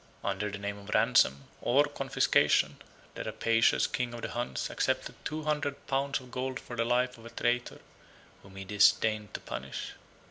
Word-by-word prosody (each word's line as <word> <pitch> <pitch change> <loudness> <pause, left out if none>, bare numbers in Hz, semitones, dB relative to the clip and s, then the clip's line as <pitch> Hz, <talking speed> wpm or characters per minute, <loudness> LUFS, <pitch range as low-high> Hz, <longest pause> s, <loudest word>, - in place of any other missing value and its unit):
Under 100 +1 -1
the 100 - -5
name 100 0 -4
of 100 0 -12
ransom, 110 - +4 0.2
or 135 +4 +4
confiscation, 145 -2 +2 0.4
the - - -5
rapacious 115 0 +2
king 125 -1 -2
of 115 - -8
the - - -2
Huns 120 +1 -3
accepted - - -1
two 155 +1 -4
hundred 150 -2 -2
pounds 140 +1 0
of 125 -1 -14
gold 130 +1 -3
for 120 - -8
the 115 - +1
life 125 +1 +1
of 115 - -14
a - - -9
traitor, 120 +1 -1 0.6
whom 100 -1 -16
he 95 0 -7
disdained 105 +1 +3
to - - -3
punish. 65 +3 -6
120 Hz, 175 wpm, -30 LUFS, 100-130 Hz, 0.6 s, ransom